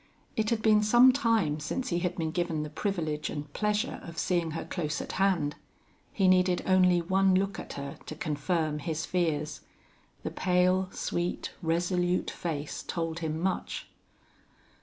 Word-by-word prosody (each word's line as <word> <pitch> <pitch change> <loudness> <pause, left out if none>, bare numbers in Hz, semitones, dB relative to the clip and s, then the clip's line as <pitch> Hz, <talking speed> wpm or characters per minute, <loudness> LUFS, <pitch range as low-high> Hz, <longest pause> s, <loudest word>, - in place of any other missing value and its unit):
It 215 -1 +1
had 225 -2 0
been 215 -1 +5
some 240 +5 +7
time 225 - +1
since 155 +12 -3
he 175 - +1
had 180 0 -1
been 160 -2 -1
given 170 -3 -1
the 150 - -6
privilege 155 -5 -2
and 145 -1 -6
pleasure 210 0 0
of 165 -1 -10
seeing 175 -2 +1
her - - -4
close 150 -5 -2
at - - -5
hand. 180 -7 +1 0.6
He 195 -3 +2
needed 185 -1 +4
only 180 -2 +4
one 190 +2 +3
look 195 +1 0
at - - -7
her 140 0 -6
to 155 - -5
confirm 150 +1 -1
his 160 +1 -3
fears. 155 -4 -1 0.6
The - - -3
pale, 185 +1 +2
sweet, 175 +1 -2
resolute 175 +2 +1
face 150 -4 -4
told 165 -1 -3
him 160 -1 -2
much. 185 +2 -2
175 Hz, 160 wpm, -29 LUFS, 155-190 Hz, 0.6 s, some